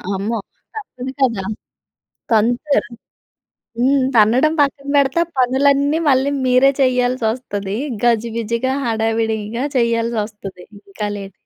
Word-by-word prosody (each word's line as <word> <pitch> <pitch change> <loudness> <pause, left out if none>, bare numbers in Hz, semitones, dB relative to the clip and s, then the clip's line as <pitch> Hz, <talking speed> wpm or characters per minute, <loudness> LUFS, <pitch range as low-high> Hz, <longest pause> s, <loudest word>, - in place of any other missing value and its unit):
అమ్మో! 215 +4 -2 0.4
తప్పదు 265 - -7
కదా! 230 -7 +1 0.9
తాంతరు. 240 +4 +1 0.9
హ్మ్. 265 +2 +3
తన్నడం 245 +9 +4
పక్కన 280 0 -1
పెడితే, 280 +2 +3
ఆ - - -27
పనులన్నీ 280 +4 +2
మళ్ళీ 265 +1 +2
మీరే 255 +2 +4
చేయల్సొస్తది. 245 -5 -1 0.3
గజిబిజిగా, 235 +2 0
హడావిడిగా 225 -1 0
ఇంకా 235 +4 -4
చేయల్సొస్తది. 225 -5 -2 0.3
ఇంకా 210 +1 -4
లేట్ 195 -1 -8
240 Hz, 100 wpm, -18 LUFS, 220-265 Hz, 0.9 s, తన్నడం